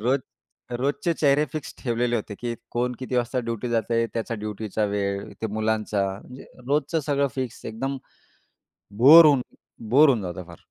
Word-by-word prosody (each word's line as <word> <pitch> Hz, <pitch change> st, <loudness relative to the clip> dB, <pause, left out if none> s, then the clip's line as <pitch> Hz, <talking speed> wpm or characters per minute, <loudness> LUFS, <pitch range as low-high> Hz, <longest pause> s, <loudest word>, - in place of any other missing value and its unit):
रोज 130 Hz, +5 st, +1 dB, 0.6 s
रोजचे 145 Hz, +5 st, 0 dB
चेहरे 145 Hz, 0 st, +4 dB
फिक्स 155 Hz, -2 st, -6 dB
ठेवलेले 120 Hz, -1 st, 0 dB
होते 105 Hz, -1 st, -5 dB
की 120 Hz, -1 st, -3 dB, 0.2 s
कोण 125 Hz, +1 st, 0 dB
किती 130 Hz, -1 st, -3 dB
वाजता 120 Hz, +1 st, 0 dB
ड्युटी 115 Hz, +1 st, -3 dB
जातंय. 115 Hz, 0 st, +1 dB
त्याचा 115 Hz, 0 st, -2 dB
ड्युटीचा 105 Hz, 0 st, -3 dB
वेळ, 100 Hz, -1 st, -2 dB
ते -, -, +1 dB
मुलांचा. 110 Hz, -2 st, 0 dB, 0.2 s
म्हणजे 130 Hz, +1 st, -12 dB, 0.2 s
रोजचं 150 Hz, +3 st, 0 dB
सगळं 140 Hz, 0 st, +2 dB
फिक्स 130 Hz, -3 st, -5 dB
एकदम 135 Hz, +5 st, -3 dB, 1.1 s
बोर 160 Hz, +5 st, +10 dB
होऊन 140 Hz, -4 st, +5 dB, 0.5 s
बोर 145 Hz, +5 st, +6 dB
होऊन 120 Hz, -5 st, +2 dB
जातं 90 Hz, -1 st, -6 dB
फार. 85 Hz, -, -13 dB
120 Hz, 155 wpm, -24 LUFS, 110-140 Hz, 1.1 s, बोर